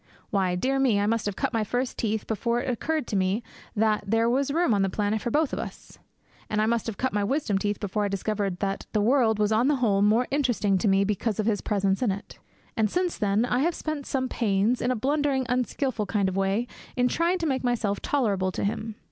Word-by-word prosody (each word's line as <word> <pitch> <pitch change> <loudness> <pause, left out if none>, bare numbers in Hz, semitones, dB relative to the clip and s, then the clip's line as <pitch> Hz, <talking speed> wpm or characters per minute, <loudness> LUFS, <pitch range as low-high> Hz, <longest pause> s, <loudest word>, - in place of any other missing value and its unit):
Why, 190 -3 +1
dear 270 +9 0
me, 245 -7 +3
I 205 - +1
must 225 0 0
have 205 - -2
cut - - -2
my 225 -1 +1
first 245 +4 -2
teeth 220 -1 -1
before 235 +2 -1
it 245 - -4
occurred 295 +4 -1
to 210 - -4
me 190 +4 +1 0.3
that 215 -1 +2
there 225 +2 +2
was 265 +4 +1
room 320 -4 +2
on 200 - +2
the 195 - +2
planet 210 +2 -1
for 240 - -2
both 300 +3 +1
of - - -2
us; - - -8 0.5
and 215 - 0
I 215 - +3
must 230 0 0
have 225 - -4
cut 260 - -1
my 205 -1 +1
wisdom 220 -3 0
teeth 205 0 -1
before 205 +1 -2
I - - +1
discovered 195 -1 -2
that 195 -1 -2
the 210 - +2
world 230 -1 +3
was 210 0 +1
on 225 +4 +3
the 295 - +3
whole 215 -6 +2
more 215 +4 +4
interesting 240 -9 +1
to 210 - 0
me 195 0 +4
because 210 +1 -1
of 215 - +1
his 215 -3 +1
presence 195 -1 0
on 250 - +2
it. 200 +2 -5 0.4
And 215 -1 +2
since 360 - 0
then 205 +2 +1
I 245 0 0
have 330 +4 +1
spent 310 -3 -4
some 260 -1 -1
pains, 220 0 +1
in 245 - 0
a 255 - +1
blundering, 275 +2 0
unskilful 250 -2 -1
kind 200 -1 +1
of 190 - -2
a - - 0
way, 195 +5 0 0.3
in 250 0 +3
trying 340 +7 +1
to 340 - -3
make 265 -4 0
myself 230 -5 0
tolerable 200 -9 0
to - - -3
him. 220 +1 -2
220 Hz, 245 wpm, -26 LUFS, 205-255 Hz, 0.5 s, more